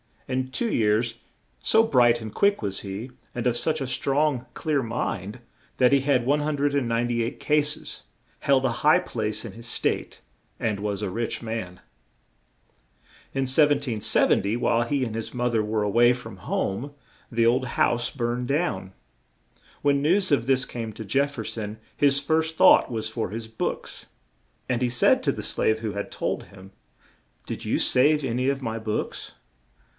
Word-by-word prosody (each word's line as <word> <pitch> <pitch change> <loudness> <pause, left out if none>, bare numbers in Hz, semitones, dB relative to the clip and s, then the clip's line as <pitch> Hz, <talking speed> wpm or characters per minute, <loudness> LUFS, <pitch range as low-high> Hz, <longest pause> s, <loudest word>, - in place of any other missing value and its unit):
In 130 0 -2
two 225 - -1
years, 110 +2 +1 0.4
so 220 0 +4
bright 120 - +4
and 110 -1 -7
quick 200 0 +2
was 100 -3 -2
he, 100 +6 -6 0.2
and 120 - -3
of 125 -1 +2
such 155 +3 0
a - - -1
strong, 135 0 0
clear 150 -3 0
mind, 115 -2 -3 0.4
that 125 -1 +4
he 140 - +5
had 135 -3 +2
198 135 -5 0
cas 150 0 +2
es, - - -7 0.4
held 135 -1 +2
a 130 - +2
high 150 +1 +6
place 110 -1 -3
in - - -6
his 115 +1 -10
State, - - -2 0.4
and 105 -3 -1
was 105 -1 -3
a 105 - -2
rich 115 +3 -3
man. 110 -6 -5 1.5
In 135 - -1
1770, 130 -7 +2
while 120 -1 +2
he 135 +2 -1
and 115 -3 -3
his 115 0 -5
moth 120 -1 -1
er 110 - +3
were 105 0 -1
a 105 - 0
way 120 +3 +5
from 125 - -8
home, 125 +9 -3 0.4
the 115 -1 +2
old 125 +3 +3
house 120 0 +2
burned 120 -2 -2
down. 140 - -1 0.9
When 140 -1 +2
news 180 +6 +2
of 130 -4 +2
this 135 -1 +3
came 115 -2 -6
to 110 - -7
Jef 140 +8 +1
fer - - -5
son, 105 -1 -5 0.2
his 140 -1 +4
first 160 +2 0
thought - - +6
was 110 -2 -3
for 110 -2 -3
his 110 +1 -6
books, 110 - -4 0.6
and 125 -1 0
he 125 - +2
said 120 0 +4
to - - +2
the - - -6
slave 110 0 +1
who 110 -2 -3
had 100 0 -4
told - - -3
him: 95 0 -15 0.7
"Did - - -6
you - - +1
save 150 +4 +3
an 125 -2 -1
y 130 - 0
of 135 0 0
my 115 -1 -3
books?" 110 -1 -4
120 Hz, 170 wpm, -25 LUFS, 110-140 Hz, 1.5 s, high